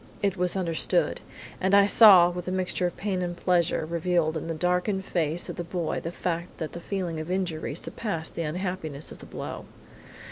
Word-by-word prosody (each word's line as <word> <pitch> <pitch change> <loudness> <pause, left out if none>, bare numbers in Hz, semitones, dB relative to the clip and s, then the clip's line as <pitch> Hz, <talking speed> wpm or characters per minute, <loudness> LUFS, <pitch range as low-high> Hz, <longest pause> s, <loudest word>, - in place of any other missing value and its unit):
It 200 -2 +2
was 180 0 0
understood, 180 - +1 0.4
and 190 +1 +3
I 200 0 +7
saw, 195 -5 +8
with 180 0 -6
a - - -1
mixture 185 -1 0
of 175 - -7
pain 195 -3 -2
and 175 -1 -3
pleasure, 175 -3 +1
revealed 170 -1 0
in 160 - -4
the 165 - -3
darkened 180 +4 0
face 165 -1 -1
of - - -6
this 175 -1 -5
boy 170 -2 -2
the 165 - -5
fact 170 0 -4
that 160 -2 -4
the 170 - -6
feeling 180 -4 -3
of 155 +2 -6
injury 180 -6 -2
surpassed 170 -2 -3
the - - -3
unhappiness 160 -2 -4
of - - -11
the - - -12
blow. - - -6
175 Hz, 200 wpm, -27 LUFS, 165-185 Hz, 0.4 s, saw